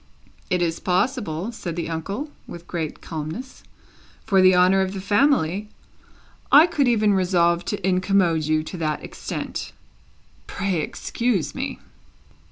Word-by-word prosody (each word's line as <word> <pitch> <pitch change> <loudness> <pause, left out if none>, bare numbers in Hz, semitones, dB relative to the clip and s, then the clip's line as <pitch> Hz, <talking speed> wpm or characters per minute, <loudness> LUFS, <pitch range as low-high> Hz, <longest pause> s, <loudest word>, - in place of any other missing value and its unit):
"It 180 -2 +1
is 165 -1 -1
possible," 185 - -1
said 175 -7 -6
the 170 -1 -3
uncle, 195 - -4 0.2
with 170 0 -9
great 160 -4 -4
calmness. 165 - -6 0.6
"For 195 -1 +4
the 185 0 +6
honour 185 +2 +5
of 190 0 -1
the 195 - -4
family, 205 - +2 0.8
I 300 +3 +9
could 300 -6 +1
even 215 -3 +3
resolve 175 -2 +2
to 200 -3 -2
incommode 185 -4 +2
you 155 0 +1
to 180 - -7
that 155 -2 -2
extent. - - -6 0.7
Pray 195 -3 -2
excuse 190 - -2
me!" - - -4
185 Hz, 135 wpm, -23 LUFS, 165-205 Hz, 0.8 s, I